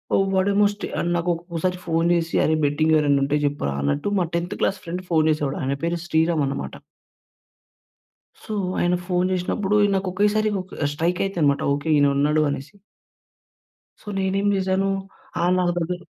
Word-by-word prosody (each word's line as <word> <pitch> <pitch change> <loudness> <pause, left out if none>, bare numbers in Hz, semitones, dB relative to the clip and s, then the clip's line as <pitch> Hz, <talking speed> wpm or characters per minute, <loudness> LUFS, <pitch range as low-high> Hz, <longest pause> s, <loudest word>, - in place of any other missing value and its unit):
ఆహ్, 195 0 +2
వాడేమో 200 +2 +3
స్టే 205 - -6
ఆహ్, - - -1
నాకొక్కోసారి 170 +1 -2
ఫోన్ 165 0 +1
చేసి 165 -1 -1
అరే! 155 - +2
బెట్టింగెవరైనా 145 -1 +2
ఉంటే 145 +2 +1
చెప్పురా 140 - -1
అన్నట్టు, 70 - -1
మా 175 - +1
10థ్ 175 +4 -2
క్లాస్ 195 -1 +1
ఫ్రెండ్ 180 +1 -5
ఫోన్ 160 -1 +3
చేసేవాడు 145 -3 -1
ఆయన 135 +1 -1
పేరు 170 +1 -1
శ్రీరామనమాట. 160 - 0 1.7
సో, 215 - -6 0.3
ఆయన 175 +1 +2
ఫోన్ 180 0 +1
జేసినప్పుడు 190 +3 -1
ఇ - - +3
నాకు 190 -1 -1
ఒకేసారి 210 +2 +2
ఒక 185 -4 -7
స్ట్రైక్ 170 +4 -1
అయితానమాట. 155 -8 +1
ఓకే. 145 +3 -4
ఈయన 145 0 +4
ఉన్నాడు 150 +2 +2
అనేసి. 140 +7 -6 1.3
సో, - - -3
నేనేం 195 +1 0
చేశాను 190 +1 0 0.5
ఆ‌! - - +2
నా 180 - +2
దగ్గర 175 +1 -1
170 Hz, 155 wpm, -23 LUFS, 150-190 Hz, 1.7 s, ఈయన